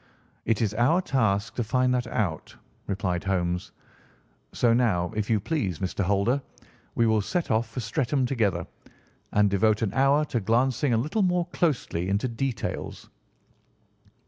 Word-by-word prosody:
"It 115 0 +1
is 105 -1 0
our 125 +10 +3
task 110 - 0
to 120 - -2
find 125 +3 +1
that 125 -1 -1
out," 95 -9 -3 0.3
replied 95 -3 -2
Holmes; 90 -2 -1 0.8
"so 120 -2 +2
now, 105 -8 +1
if 105 -1 -2
you 110 -2 +3
please, 100 - -2
Mr. 95 +3 -2
Holder, 100 +8 +1 0.5
we 115 - +3
will 110 -1 +3
set 175 - -2
off 110 +1 +1
for 120 +3 -5
Streatham 130 +3 0
together, 115 -6 0 0.7
and 105 0 +4
devote 105 +2 +2
an 100 - -1
hour 140 +3 +3
to 125 - -1
glancing 120 +5 +1
a - - +2
little 155 - 0
more 180 -2 +2
closely 120 - 0
into 100 +6 0
details." 120 -1 -4
115 Hz, 150 wpm, -26 LUFS, 100-130 Hz, 0.8 s, and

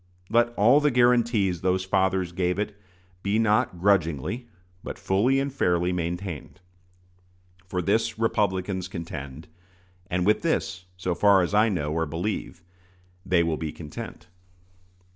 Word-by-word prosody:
Let 120 +1 +4
all 120 +8 +5
the 150 0 +3
guarantees 120 - +2
those 95 0 +1
fathers 95 -2 +1
gave 90 0 -1
it 105 0 -3 0.5
be 100 +2 0
not 110 -3 +2
grudgingly, 95 - +1 0.4
but - - -6
fully 120 +8 +2
and 140 0 -2
fairly, 90 -8 +1
maintained. 85 -1 -4 1.1
For 90 0 -2
this 110 +4 +1
Republicans 95 -4 0
contend, 80 -5 -7 0.6
and 90 0 -1
with 105 +2 +3
this, 95 - -1
so 90 0 -1
far 95 +1 +4
as 90 - -3
I 105 +2 +4
know 75 -7 -2
or 80 0 0
believe, 85 +2 -4 0.6
they 90 -2 +2
will 80 -2 -1
be 80 -1 -4
content. 75 -2 -9
95 Hz, 135 wpm, -26 LUFS, 85-110 Hz, 1.1 s, all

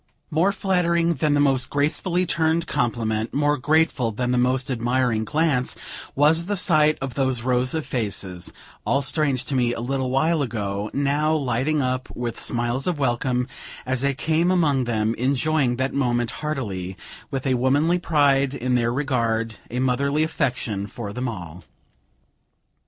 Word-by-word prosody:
More 165 +6 +3
flattering 170 -4 +1
than 150 0 +1
the - - +2
most 135 -3 +2
gracefully 165 +5 0
turned 165 0 +1
compliment, 115 -6 -1
more 145 +1 +2
grateful 150 -3 +2
than 125 +3 -2
the 125 - +2
most 130 +2 +1
admiring 120 -2 0
glance, 150 -4 0 0.4
was 160 +4 +3
the 205 - 0
sight 155 -4 +3
of 135 -2 -4
those 130 -3 0
rows 125 +2 +1
of 160 - -2
faces, 100 -6 -4 0.3
all 140 +1 +1
strange 135 -3 +1
to 145 - -4
me 120 -2 +2
a - - -5
little 130 +2 -2
while 155 +5 +2
ago, 105 -5 -3
now 145 +3 +1
lighting 140 +1 0
up, 130 0 -2
with 120 -1 -4
smiles 120 +3 -1
of 175 -3 0
welcome, 125 -1 0 0.4
as 130 0 -1
I 140 0 +2
came 160 +5 +1
among 150 -8 +2
them, 110 -1 0
enjoying 135 0 +1
that 130 +2 -1
moment 120 -3 0
heartily, 100 -12 -3 0.3
with 135 0 -4
a 130 - +2
womanly 145 +8 +2
pride 140 -4 +2
in 125 0 -1
their 120 -1 +2
regard, 115 -5 -1
a 120 - -5
motherly 140 +4 +1
affection 115 -9 -2
for 105 -1 -7
them 125 +2 -3
all. 90 -6 -7
130 Hz, 155 wpm, -23 LUFS, 120-150 Hz, 0.4 s, More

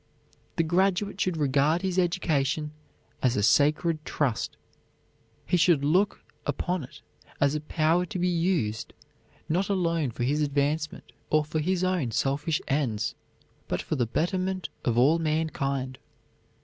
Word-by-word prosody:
The 165 - +2
graduate 190 +4 +1
should 180 -3 0
regard 145 +4 +2
his 185 -1 0
education 155 -4 0 0.5
as 125 -3 +2
a 105 - +1
sacred 155 - +3
trust. 140 -7 -1 0.9
He 180 - +2
should 165 -5 +4
look 185 +7 +2 0.2
upon 180 -3 -2
it - - -12 0.4
as 140 0 +3
a 150 - -2
power 160 +3 +1
to 215 - -5
be 180 0 +1
used, 165 - 0 0.5
not 180 +5 0
alone 170 -7 +1
for 120 +1 -4
his 145 +5 +1
advancement, 145 +2 -1 0.2
or 155 0 +3
for 155 +1 -2
his 180 +3 0
own 180 -9 +1
selfish 140 +7 0
ends, 115 -6 0 0.5
but - - -1
for - - -2
the 120 -4 0
betterment 185 - -1
of 120 -2 0
all 145 +7 +5
mankind. 140 -5 -1
155 Hz, 140 wpm, -27 LUFS, 140-180 Hz, 0.9 s, all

